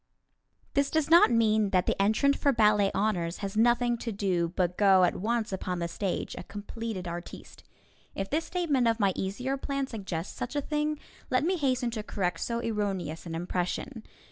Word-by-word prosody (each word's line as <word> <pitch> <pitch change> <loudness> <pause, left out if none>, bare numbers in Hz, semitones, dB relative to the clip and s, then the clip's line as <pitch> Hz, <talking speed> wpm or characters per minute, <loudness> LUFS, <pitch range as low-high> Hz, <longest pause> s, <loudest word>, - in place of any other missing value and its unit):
This 280 0 +2
does 315 -1 0
not 340 - +8
mean 220 -3 +3
that 185 -2 +2
the - - 0
entrant 220 +8 +3
for 285 - +2
ballet 210 -4 +4
honors 180 -5 -1
has 195 - -5
nothing 240 +1 +3
to 230 - -4
do 185 -5 0
but 180 -2 0
go 195 -2 +5
at 180 - +2
once 220 +1 -1
upon 180 -1 -3
the 170 0 -2
stage, 190 +2 -3
a - - -6
completed 205 -2 -6
artiste. 170 +1 -8 0.5
If 195 - -3
this 315 +7 -1
statement 300 -9 +1
of 230 0 +1
my 200 -3 +3
easier 250 +8 -2
plan 275 0 -2
suggests 195 -8 -5
such 250 +4 -5
a 290 - +1
thing, 300 +1 -1 0.3
let 255 +2 +2
me 365 +4 +1
hasten 255 -6 0
to 220 -2 -3
correct 180 -5 -2
so 235 - -2
erroneous 190 -7 -2
an 165 - -4
impression. 180 +8 -3
215 Hz, 185 wpm, -28 LUFS, 185-255 Hz, 0.5 s, not